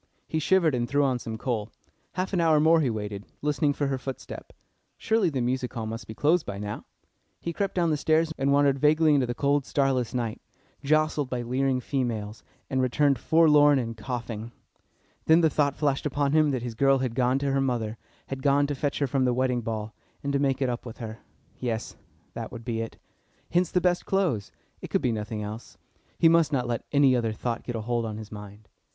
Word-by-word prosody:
He 160 - -1
shivered, 165 -1 +3
and 120 -1 -1
threw 145 +1 +2
on 130 -3 +1
some 110 -2 -6
coal. 110 -3 -2 0.4
Half 185 +2 -3
an 180 - +2
hour 160 -2 +4
more 160 +2 +5
he 135 - +1
waited, 105 -2 -4 0.2
listening 150 0 +2
for 145 0 -1
her 135 -1 -1
footstep. 135 -1 -7 0.5
Surely 220 -5 +2
the 135 -5 -2
music 125 +1 -1
hall 115 -2 -3
must 115 +2 -6
be 110 - -8
closed 160 +6 +3
by 100 - -6
now. 105 +1 -5 0.5
He 170 - -4
crept 195 +3 -2
down 170 -3 +2
the 150 - +1
stairs, 160 +2 +2
and 140 +1 +1
wandered 140 -1 +3
vaguely 155 +2 +4
into 135 -3 +2
the 120 - -3
cold, 140 +1 +1
starless 130 -4 0
night, 115 -3 -2 0.4
jostled 155 -1 +1
by 125 -2 -2
leering 130 +2 0
females, 115 -6 -3 0.3
and 130 -1 0
returned 135 +1 +2
forlorn 150 -2 +5
and 115 -3 -2
coughing. 115 -1 -5 0.7
Then 160 +2 +6
the 160 -2 +3
thought 140 -1 +1
flashed 145 -1 0
upon 145 0 0
him 155 0 +4
that 130 -4 -2
his 120 -2 -4
girl 135 +4 +3
had 130 -3 -2
gone 125 +1 +2
to 140 0 -1
her 135 0 +1
mother, 120 -4 -2 0.3
had 135 0 -6
gone 140 0 +3
to 145 - -2
fetch 140 +1 -2
her 145 - +1
from 130 0 +1
the 125 -1 +1
wedding 125 -1 +1
ball, 110 -1 -4 0.3
and 140 0 -2
to 140 - +2
make 135 -1 +1
it - - +1
up 120 0 -3
with 115 -3 -9
her. 115 -1 -7 0.4
Yes; 115 -3 -3 0.4
that - - -6
would 115 -1 -9
be 115 -2 -2
it. 115 - -6 0.5
Hence 175 0 +2
the 180 - +2
best 175 -1 +1
clothes. 170 - 0 0.3
It - - -6
could - - 0
be 125 - +2
nothing 105 -1 -4
else. 110 +3 -8 0.4
He 165 - +5
must 165 -1 +4
not 130 -4 0
let 120 -2 -3
any 140 -3 +5
other 115 -3 0
thought 115 +2 -3
get 120 - -5
a 110 - -2
hold 120 +1 -1
on 110 -1 -5
his 110 -1 -9
mind. 105 0 -10
130 Hz, 220 wpm, -27 LUFS, 115-145 Hz, 0.7 s, Then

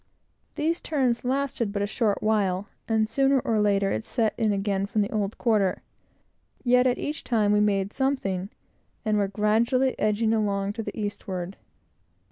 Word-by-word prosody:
These 330 +3 0
turns 260 -6 0
lasted 255 -4 -1
but 200 -1 -1
a - - +1
short 210 0 0
while, 205 -3 +1 0.2
and 220 -1 +2
sooner 270 +4 +3
or 225 -3 0
later 200 -1 +2
it 110 - -2
set 225 -2 0
again 200 -2 0
from 210 +1 +1
the 200 - -4
old 210 -1 -2
quarter; 210 -6 +1 0.8
yet 250 0 +4
each 300 +1 -4
time 215 -4 +2
we 210 - +4
made 200 -1 +1
something, 200 -9 -1 0.6
and 215 -1 +2
were 200 - +1
gradually 225 +6 +2
edging 220 +1 +2
along 200 -2 0
to 225 - -4
the 225 - -6
eastward. 195 -3 -4
215 Hz, 155 wpm, -26 LUFS, 200-235 Hz, 0.8 s, yet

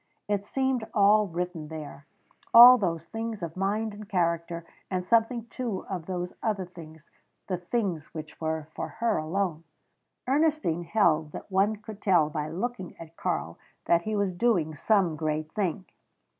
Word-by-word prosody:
It 205 -1 0
seemed 265 +2 0
all 210 0 +5
written 175 -2 -4
there 150 -2 -8 0.5
all 245 +2 +11
those 165 -5 -1
things 225 -2 -5
of 165 -1 -5
mind 205 +3 -1
and 210 0 -10
character, 170 -3 -1 0.2
and 185 -1 -2
something 230 +2 +2
too 235 -4 -4
of 180 -4 -5
those 180 -1 -3
other 205 -4 -1
things 160 -3 -13 0.3
the 185 - -2
things 180 -4 -2
which 155 0 -9
were 160 -1 -2
for 165 - -4
her 225 +4 -1
alone. 165 0 -2 0.6
Ernestine 280 - +1
held 165 -6 +2
that - - -9
one 195 +3 +3
could 215 -1 -11
tell 170 -6 +3
by 150 -1 -3
looking 190 +3 -4
at 165 0 -12
Karl 165 - -3 0.3
that 170 0 +4
he 215 +4 -3
was 200 -2 0
doing 175 -6 +1
some 185 +1 +2
great 155 0 -2
thing. 190 -2 -2
185 Hz, 155 wpm, -27 LUFS, 165-215 Hz, 0.6 s, all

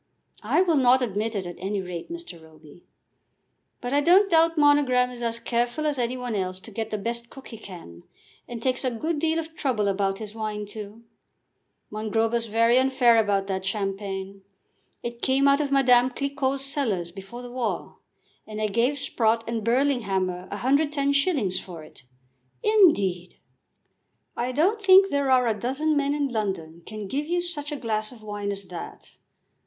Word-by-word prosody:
"I 365 - +2
will 335 -5 +2
not 255 0 +4
admit 220 0 -2
it, 195 -2 -2
at 175 -1 -7
any 195 +2 -2
rate, 180 - -6
Mr. 335 - -8
Roby." 160 +1 -17 0.9
"But 245 +2 -3
I 290 - +3
don't 375 +5 +5
doubt 330 0 +4
Monogram 280 -4 +4
is 245 -1 -9
as 230 -1 -1
careful 240 +5 -1
as 295 -3 0
any 245 +1 -1
one 250 -2 -4
else 185 -2 -2
to 225 - -11
get 220 +1 -4
the 215 - -2
best 235 +3 -4
cook 270 - -12
he 225 - -9
can, 170 - -11 0.5
and 235 -1 -7
takes 255 0 0
a 255 - +1
good 300 +7 -2
deal 320 +1 +1
of 325 0 -5
trouble 235 -9 0
about 195 0 0
his 215 -1 -8
wine 215 -1 -4
too. 210 +2 -9 0.9
Mongrober 220 +2 -1
is 230 0 -3
very 230 +3 +4
unfair 260 -3 +4
about 200 -2 +1
that 190 -1 -3
champagne. 195 -1 -4 0.6
It 235 0 -6
came 270 +1 +3
out 280 +1 +4
of 285 -2 -2
Madame 250 -2 +5
Cliquot's 275 0 -1
cellars 215 - -1
before 195 +6 -10
the 245 - -9
war, 245 -3 -4 0.5
and 215 0 -6
I 215 -1 0
gave 240 +7 +1
Sprott 230 -4 +1
and 230 -2 -3
Burlinghammer 205 -8 0
110s. 280 - +1
for 170 -4 -10
it." 135 -4 -15 0.6
"Indeed!" 205 - +3 1.0
"I 245 +2 -2
don't 370 - +1
think 385 0 +6
there 280 -1 +1
are 255 -1 +4
a 230 - +2
dozen 285 +6 0
men 285 0 +1
in 285 -2 0
London 190 -8 -3
can 215 -2 -6
give 285 +8 -3
you 350 +1 0
such 325 -4 -4
a - - -2
glass 215 -3 -2
of 230 -4 -14
wine 205 -1 -4
as 200 0 -6
that. 175 -2 -9
235 Hz, 175 wpm, -25 LUFS, 200-280 Hz, 1.0 s, think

